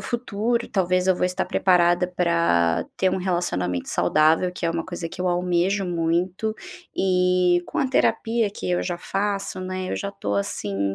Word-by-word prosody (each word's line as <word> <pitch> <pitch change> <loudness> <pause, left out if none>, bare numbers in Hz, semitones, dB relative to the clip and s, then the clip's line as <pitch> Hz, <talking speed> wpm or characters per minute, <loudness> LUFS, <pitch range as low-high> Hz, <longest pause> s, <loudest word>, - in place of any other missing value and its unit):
futuro, 235 0 -2
talvez 185 -1 +1
eu 185 - +4
vou - - 0
estar 185 +1 0
preparada 180 -1 +3
para 170 - +1
ter 190 -1 +2
um 190 - -1
relacionamento 175 - -1
saudável, 155 - +2
que 175 - -6
é 165 - +2
uma 165 0 -2
coisa 175 -2 -5
que - - -10
eu 185 - 0
almejo 180 +2 +1
muito. 175 +5 -1 0.4
E 180 -1 +3
com - - -4
a 270 - +1
terapia 230 -3 +1
que 200 - -5
eu 175 - +1
já 175 -1 -2
faço, 195 +1 -2
né, 185 0 -4
eu - - -2
já 200 - -3
estou, 100 - -3
assim, 100 -1 -2
180 Hz, 175 wpm, -23 LUFS, 170-190 Hz, 0.4 s, eu